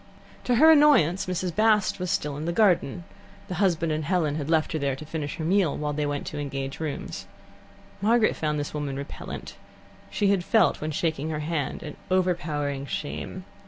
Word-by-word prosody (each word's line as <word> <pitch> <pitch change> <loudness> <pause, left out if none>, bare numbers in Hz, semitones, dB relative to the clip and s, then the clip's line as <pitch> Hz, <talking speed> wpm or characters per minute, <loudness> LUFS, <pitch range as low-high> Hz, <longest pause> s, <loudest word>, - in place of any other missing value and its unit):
To 245 - +2
her 315 +7 +7
annoyance, 210 - +5
Mrs. 180 -1 -2
Bast 215 -2 +3
was 180 0 -3
still 150 -6 -1
in 150 +2 -5
the 170 - 0
garden; 180 -5 +2 0.4
the - - -4
husband 170 -4 +2
and 155 0 -1
Helen 160 -3 +1
had 150 0 -4
left 160 -1 +2
her 155 - -1
there 140 -2 0
to 155 - -9
finish 155 -2 -4
her 160 - -5
meal 185 -3 +2
while 150 0 -2
they 150 0 -1
went 145 0 -3
to - - -5
engage 135 -1 -4
rooms. 155 -3 -5 0.7
Margaret 225 +2 +3
found 150 -1 -1
this 145 - -4
woman 145 -2 -3
repellent. 140 +1 -7 0.5
She 205 -2 +1
had 195 -3 +1
felt, 220 +5 +3
when 155 - -2
shaking 155 -1 -1
her 155 -1 -3
hand, 150 -3 -3
an 150 - -8
overpowering 150 -7 0
shame. 180 +6 -5
160 Hz, 190 wpm, -26 LUFS, 145-185 Hz, 0.7 s, her